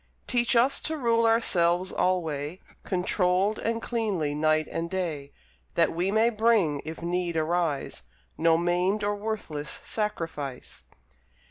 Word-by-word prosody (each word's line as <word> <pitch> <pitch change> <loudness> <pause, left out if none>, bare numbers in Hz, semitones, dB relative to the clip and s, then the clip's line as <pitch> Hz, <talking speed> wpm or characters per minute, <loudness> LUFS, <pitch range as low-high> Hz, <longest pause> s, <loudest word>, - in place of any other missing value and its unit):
Teach 240 -1 +2
us 255 +4 +4
to 315 0 -3
rule 230 -3 +2
ourselves 185 -5 +2
alway, 160 -2 -1 0.2
Controlled 185 +2 +1
and 230 0 -2
cleanly 200 -11 -1
night 155 +1 +1
and 165 +1 -3
day, 160 -7 -3 0.4
That - - +3
we 175 +3 0
may 220 +3 +3
bring, 215 -10 +2
if 160 +2 -7
need 175 -1 -1
arise, 160 -2 -1 0.3
No 165 0 +3
maimed 180 +4 +1
or 205 0 0
worthless 200 -9 -4
sacrifice. 165 - -4
180 Hz, 125 wpm, -27 LUFS, 160-220 Hz, 0.4 s, us